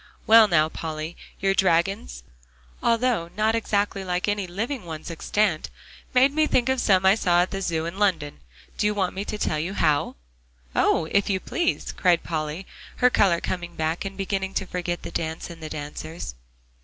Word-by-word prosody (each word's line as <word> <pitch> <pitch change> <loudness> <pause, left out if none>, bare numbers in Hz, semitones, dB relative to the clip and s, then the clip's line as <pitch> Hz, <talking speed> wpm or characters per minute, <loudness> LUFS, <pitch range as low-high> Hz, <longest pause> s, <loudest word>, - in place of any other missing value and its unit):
"Well, 225 0 +8
now, 155 -5 +3
Polly, 160 0 -5 0.2
your 195 0 +2
dragons, 170 - +1 0.6
although 230 -7 +1
not 215 +1 +2
exactly 205 -3 0
like 180 +1 -1
any 205 -2 -1
living 225 +8 -3
ones 160 -1 -7
extant, 175 0 0 0.5
made 265 +2 +5
me 310 0 +3
think 250 -2 +2
of 265 -1 +1
some 190 -2 +3
I 190 - +7
saw 175 -4 +3
at 180 - -5
the 195 - -3
Zoo, 165 -3 -1
in 170 +4 -5
London. 165 - 0 0.4
Do 210 - +2
you 210 - 0
want 190 -3 0
me 195 - -3
to 210 - -4
tell 155 -6 -1
you 180 +6 -3
how?" 150 -6 +1 0.6
"Oh! 165 - +3
if 200 0 +2
you 190 -1 +1
please," 340 - -1
cried 175 -2 +2
Polly, 155 +2 -3 0.3
her 250 0 +4
color 185 -7 +3
coming 175 -1 -4
back, 160 +1 -1
and 195 -1 -6
beginning 195 -1 -2
to 195 - 0
forget 175 -1 -3
the - - -6
dance 160 0 -4
and 165 -1 -11
the 155 - -6
dancers. 150 - -6
185 Hz, 185 wpm, -25 LUFS, 165-205 Hz, 0.6 s, Well